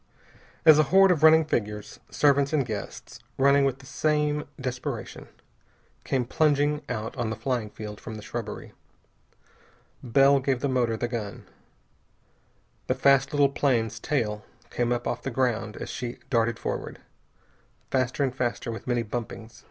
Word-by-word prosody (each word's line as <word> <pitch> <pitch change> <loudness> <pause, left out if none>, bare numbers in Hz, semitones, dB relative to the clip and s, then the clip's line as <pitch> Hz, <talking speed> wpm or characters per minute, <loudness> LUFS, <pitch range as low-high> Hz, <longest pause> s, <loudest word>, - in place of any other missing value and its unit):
As 155 -1 +8
a - - +6
horde 195 0 +6
of 165 -4 +1
running 160 0 +7
figures, 105 -7 -3
servants 140 0 +2
and 145 -4 +2
guests, 110 -3 -7 0.2
running 140 +1 +4
with 135 -1 0
the 135 - -16
same 150 +1 0
desperation, 130 -2 -5 0.8
came 130 -2 0
plunging 145 +2 +2
out 110 -2 -4
on 120 -3 -1
the 110 - -3
flying 115 -1 -2
field 105 0 -8
from 110 - -7
the 105 - -9
shrubbery. 110 -1 -6 1.3
Bell 135 +3 +4
gave 135 -1 0
the 140 - +1
motor 120 -4 0
the 120 - -2
gun. 110 -5 -5 1.4
The 130 - +1
fast 135 0 +3
little 145 -1 +3
plane's 115 -6 0
tail 105 -6 -1 0.3
came 120 0 0
up 120 0 -1
off 120 - -2
the - - -4
ground 120 -4 -1
as - - -6
she 120 -1 -5
darted 115 -2 +2
forward. - - -4 0.9
Faster 130 +1 0
and 130 -2 0
faster, 120 -2 -2
with 115 - -8
many 120 -1 +1
bumpings. 115 0 -6
125 Hz, 150 wpm, -26 LUFS, 115-140 Hz, 1.4 s, As